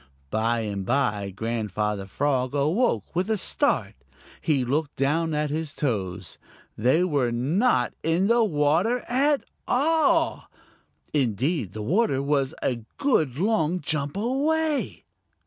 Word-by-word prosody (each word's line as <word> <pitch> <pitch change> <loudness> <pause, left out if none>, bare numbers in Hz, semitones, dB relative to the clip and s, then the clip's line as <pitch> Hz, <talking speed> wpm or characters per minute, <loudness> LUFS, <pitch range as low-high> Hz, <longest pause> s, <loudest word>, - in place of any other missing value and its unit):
By 115 +1 +1
and 100 -3 -3
by 105 -4 0
Grandfather 105 -1 -2
Frog 130 +3 0
awoke 150 - 0
with 185 +4 0
a 220 - +2
start. - - 0 0.5
He 140 -6 +1
looked 145 +3 -1
down 155 +4 0
at 150 -1 -1
his 155 -1 -3
toes. 95 - -3 0.4
They 130 +10 +3
were 140 -9 +1
not 135 - +1
in 165 +4 +1
the 235 +2 +4
water 170 +7 +2
at 280 +3 +2 0.2
all! 320 +4 +2 0.7
Indeed, 130 - 0
the 110 - -5
water 175 - +1
was 140 -1 0
a 125 - 0 0.2
good 160 - +1
long 180 -3 +1
jump 150 0 -2
away. 290 +6 0
145 Hz, 125 wpm, -25 LUFS, -, 0.7 s, the